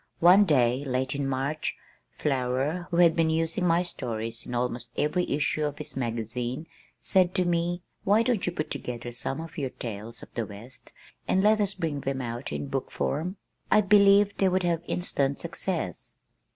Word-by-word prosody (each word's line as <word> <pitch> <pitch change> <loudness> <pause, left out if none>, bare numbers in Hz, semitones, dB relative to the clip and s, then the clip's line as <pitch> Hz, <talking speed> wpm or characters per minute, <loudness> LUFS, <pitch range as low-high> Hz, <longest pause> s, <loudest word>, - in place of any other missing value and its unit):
One 185 +4 +7
day, 130 -5 +3
late 130 0 -1
in 140 -1 -1
March, 135 +3 -2 0.4
Flower, 135 +5 0
who 170 - -1
had 170 -2 +6
been 165 -1 +3
using 165 +3 +1
my 170 +1 +3
stories 115 -7 -5
in 120 - -4
almost 120 -1 -2
every 175 +4 +1
issue 150 +1 0
of 145 -1 -2
his - - -6
magazine, 120 +3 -3 0.4
said 185 -2 +3
to 185 -2 +2
me: 175 0 0 0.2
"Why 210 +3 +4
don't 235 -4 +1
you - - +1
put 155 -3 -4
together 120 0 -5
some 130 +3 -4
of 165 0 -7
your 135 -2 -1
tales 115 -2 -7
of - - -14
the 115 -3 -2
west, 110 +5 -10 0.4
and 190 - +2
let 215 +1 +5
us 200 -1 0
bring 160 -6 -2
them 135 0 -2
out 120 0 -4
in - - -3
book 135 -1 -3
form? 175 +7 -2 0.3
I 215 - +6
believe 200 0 +5
they 195 - +4
would 185 0 +1
have 170 -2 +1
instant 140 -6 -1
success." - - -4
150 Hz, 180 wpm, -27 LUFS, 125-180 Hz, 0.4 s, One